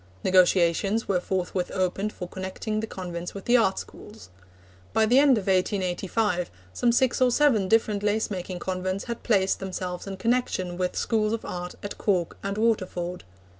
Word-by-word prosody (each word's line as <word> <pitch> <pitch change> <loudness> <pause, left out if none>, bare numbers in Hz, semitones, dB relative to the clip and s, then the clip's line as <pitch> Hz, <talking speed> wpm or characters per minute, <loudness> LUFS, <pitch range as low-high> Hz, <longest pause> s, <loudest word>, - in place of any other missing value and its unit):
Negotiations 185 +3 +3
were 190 -3 +2
forthwith 180 0 -2
opened 190 +3 0
for 180 - -7
connecting 190 +4 -4
the 220 - -3
convents 175 -3 -6
with 200 - -7
the 240 - +4
art 205 -5 +3
schools. 215 +1 -10 0.6
By 220 - +4
the 245 +5 +5
end 280 -4 +5
of 200 - -3
1885 185 0 0 0.2
some 240 - +2
six 250 +1 +2
or 255 - +6
seven 245 -7 +3
different 215 -1 +2
lace 210 +2 0
making 185 -1 -4
convents 185 +1 -3
had 235 -1 -5
placed 195 -4 +2
themselves 185 -1 -5
in 195 -1 -5
connection 225 -6 0
with 180 0 -2
Schools 215 -1 +1
of 230 - -3
Art 180 0 -5
at 205 - -6
Cork 180 -5 0
and 200 +1 -3
Waterford. 185 -5 -1
195 Hz, 170 wpm, -26 LUFS, 180-220 Hz, 0.6 s, or